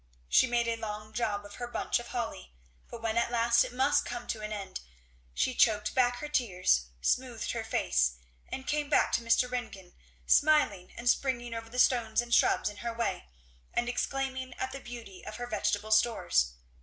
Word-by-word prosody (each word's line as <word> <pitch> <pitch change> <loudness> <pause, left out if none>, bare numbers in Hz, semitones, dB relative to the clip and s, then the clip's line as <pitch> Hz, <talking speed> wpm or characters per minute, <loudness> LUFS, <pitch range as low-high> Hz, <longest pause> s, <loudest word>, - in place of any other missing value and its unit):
She 260 - +5
made 235 -1 +1
a 230 0 0
long 215 -1 -6
job 210 -3 -1
of 205 - -11
her 240 - -4
bunch 240 - -1
of 240 - -9
holly. 60 - -5 0.3
But 230 - -9
when 225 0 0
at 235 - 0
last 235 0 +4
it - - -6
must 265 +3 +2
come 240 0 -5
to 220 - -2
an 215 0 -5
end 200 - -5 0.6
she 255 - +1
choked 215 -3 +3
back 245 -1 +3
her 300 - -5
tears, 185 - +2 0.2
smoothed - - 0
her - - -3
face, - - +1 0.4
and 265 - -5
came 295 -1 -1
back - - +3
to - - +1
Mr. 230 +2 +3
Ringgan 220 -8 -6 0.3
smiling 290 - +3
and 240 - -6
springing 240 -2 +1
over 225 0 -6
the 245 - -8
stones 235 -3 +3
and 240 0 -1
shrubs - - +4
in 205 -1 -4
her 235 +1 -4
way, 235 - -2 0.5
and 240 - +1
exclaiming 260 0 -2
at 260 - -3
the 275 - -6
beauty 235 -7 -10
of 215 - -7
her 245 - -4
vegetable 215 -2 -1
stores. 65 - +3
235 Hz, 195 wpm, -30 LUFS, 210-245 Hz, 0.6 s, She